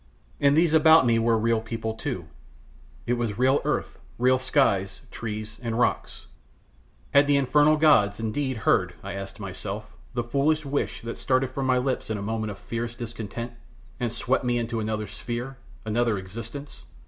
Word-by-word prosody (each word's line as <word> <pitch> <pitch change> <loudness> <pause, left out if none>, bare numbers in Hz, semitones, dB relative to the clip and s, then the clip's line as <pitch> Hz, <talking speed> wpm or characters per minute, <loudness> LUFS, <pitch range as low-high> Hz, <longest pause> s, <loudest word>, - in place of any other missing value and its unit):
And 140 +1 +4
these 165 -1 +4
about 160 -2 +7
me 115 -1 +3
were 115 0 +3
real 115 0 +1
people, 115 0 -4
too; 110 - -4 0.8
it 120 0 0
was 110 -4 -2
real 130 +3 +3
earth; - - -2 0.2
real 130 +1 +3
skies, 115 -8 +1
trees, 110 -1 -6
and 115 -2 -2
rocks 125 - 0 0.9
had 140 0 +6
the 145 -1 +4
infernal 150 +3 +4
gods 110 -10 +4
indeed 130 +4 -2
heard, - - +3
I - - -5
asked 95 +1 -7
myself, 105 +2 -6 0.2
the 120 - 0
foolish 145 +5 +1
wish 140 -3 -2
that 115 0 -6
started 130 -1 +1
from 135 0 -2
my 130 -1 +3
lips 125 -1 -1
in 110 - -1
a - - -5
moment 110 +1 -2
of 100 - -6
fierce 115 +2 -4
discontent, 115 0 -6 0.5
and 120 -2 -1
swept 130 +3 0
me 120 -1 +1
into 115 -1 -2
another 110 0 -2
sphere, 120 +5 -5 0.3
another 110 0 +1
existence? 115 +9 -8
120 Hz, 170 wpm, -26 LUFS, 110-135 Hz, 0.9 s, about